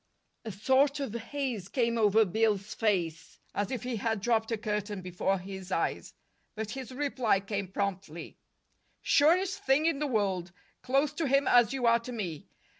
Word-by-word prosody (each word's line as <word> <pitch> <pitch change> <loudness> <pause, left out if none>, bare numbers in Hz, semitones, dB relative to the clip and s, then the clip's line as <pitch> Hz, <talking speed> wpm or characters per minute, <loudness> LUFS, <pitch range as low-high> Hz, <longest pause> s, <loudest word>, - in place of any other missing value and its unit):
A 220 - -4
sort 265 +8 +2
of 270 -6 -3
haze 235 -4 -4
came 235 -3 +1
over 220 -1 +4
Bill's 210 +1 0
face, 175 -7 -1 0.2
as 205 -1 -1
if 255 - -4
he 250 -2 -3
had 220 0 -1
dropped 225 +1 0
a 225 - 0
curtain 210 -2 -3
before 185 +2 -1
his 190 0 -8
eyes. - - -2 0.4
But 215 -1 -4
his 265 -1 -6
reply 255 -6 +1
came 200 0 -4
promptly: 190 -4 -4 0.6
"Surest 365 +6 +3
thing 275 +4 +3
in 330 -4 +1
the 300 - 0
world. 195 -7 -1 0.3
Close 275 +3 +1
to 310 0 -1
him 275 +1 +3
as 240 -2 +5
you 265 -2 -1
are 235 0 +5
to 235 +2 -8
me. 180 -10 -5
220 Hz, 170 wpm, -30 LUFS, 195-265 Hz, 0.6 s, as